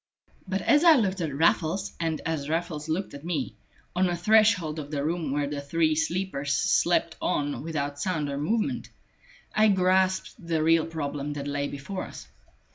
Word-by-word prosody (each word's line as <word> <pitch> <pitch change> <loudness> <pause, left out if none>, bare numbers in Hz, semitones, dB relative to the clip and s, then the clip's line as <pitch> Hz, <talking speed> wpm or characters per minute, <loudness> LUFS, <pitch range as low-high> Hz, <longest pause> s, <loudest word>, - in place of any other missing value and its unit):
But 190 +1 -1
as 295 +1 +4
I 335 -2 +8
looked 195 -7 0
at 160 -3 -1
Raffles, 165 +6 +1
and 160 -2 -1
as 155 -3 -2
Raffles 160 -2 -2
looked 180 +2 -2
at 140 0 -9
me, 170 -1 -3 0.4
on 185 +1 +3
the 175 - 0
threshold 185 -5 +3
of 145 -1 -7
the 145 -2 -2
room 160 -3 -1
where 145 +1 0
the 145 0 -4
three 155 +2 +1
sleepers 155 -3 -1
slept - - +2
on 145 0 -1
without 145 -2 -3
sound 155 -3 -1
or 140 0 -3
movement, 215 +9 -1 0.6
I 215 0 +4
grasped 190 -1 +2
the 165 -2 0
real 165 0 +3
problem 145 -2 -4
that 140 -1 -5
lay 145 0 -1
before 145 +8 -5
us. - - -10
160 Hz, 175 wpm, -27 LUFS, 145-185 Hz, 0.6 s, I